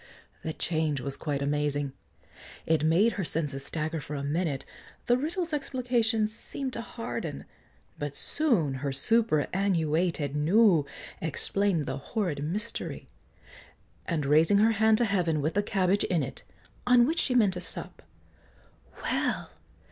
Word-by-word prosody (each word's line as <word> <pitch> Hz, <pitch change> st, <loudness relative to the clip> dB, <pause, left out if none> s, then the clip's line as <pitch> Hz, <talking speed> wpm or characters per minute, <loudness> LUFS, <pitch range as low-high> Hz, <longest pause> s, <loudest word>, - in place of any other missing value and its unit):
The 160 Hz, -, -4 dB
change 155 Hz, -4 st, -1 dB
was 135 Hz, +2 st, -3 dB
quite 145 Hz, -3 st, -2 dB
amazing; 145 Hz, -1 st, 0 dB, 0.7 s
It 160 Hz, -2 st, +2 dB
made 175 Hz, +9 st, +4 dB
her 195 Hz, -, -2 dB
senses 150 Hz, -4 st, 0 dB
stagger 160 Hz, +2 st, -3 dB
for 150 Hz, -, -6 dB
a 140 Hz, -, -4 dB
minute, 145 Hz, -1 st, -1 dB, 0.4 s
The 245 Hz, -, +4 dB
riddle's 325 Hz, +5 st, -2 dB
explication 245 Hz, -6 st, +1 dB
seemed 255 Hz, +4 st, -2 dB
to 230 Hz, -, -3 dB
harden; 230 Hz, 0 st, -5 dB, 0.5 s
But -, -, -4 dB
soon 225 Hz, -, +1 dB
her 140 Hz, -1 st, -1 dB
superannuated 165 Hz, -3 st, +1 dB
nous 170 Hz, +1 st, +4 dB, 0.4 s
Explain'd 165 Hz, +2 st, 0 dB
the 130 Hz, +1 st, -3 dB
horrid 155 Hz, -, -3 dB
mystery; 210 Hz, +9 st, -3 dB, 1.0 s
and 160 Hz, -5 st, -1 dB
raising 160 Hz, +8 st, +5 dB
Her 220 Hz, +2 st, +5 dB
hand 220 Hz, 0 st, +4 dB
to 240 Hz, -, +3 dB
heaven, 175 Hz, -7 st, +1 dB
with 155 Hz, +3 st, -1 dB
the 205 Hz, -, +2 dB
cabbage 195 Hz, -1 st, +1 dB
in 170 Hz, -5 st, +1 dB
it, 135 Hz, -, -6 dB, 0.5 s
On 245 Hz, -1 st, +6 dB
which 325 Hz, +5 st, 0 dB
she 255 Hz, -, +1 dB
meant 210 Hz, -6 st, +4 dB
to 180 Hz, -, -4 dB
sup, -, -, -6 dB, 1.0 s
"Well! -, -, -1 dB
175 Hz, 140 wpm, -28 LUFS, 150-220 Hz, 1.0 s, On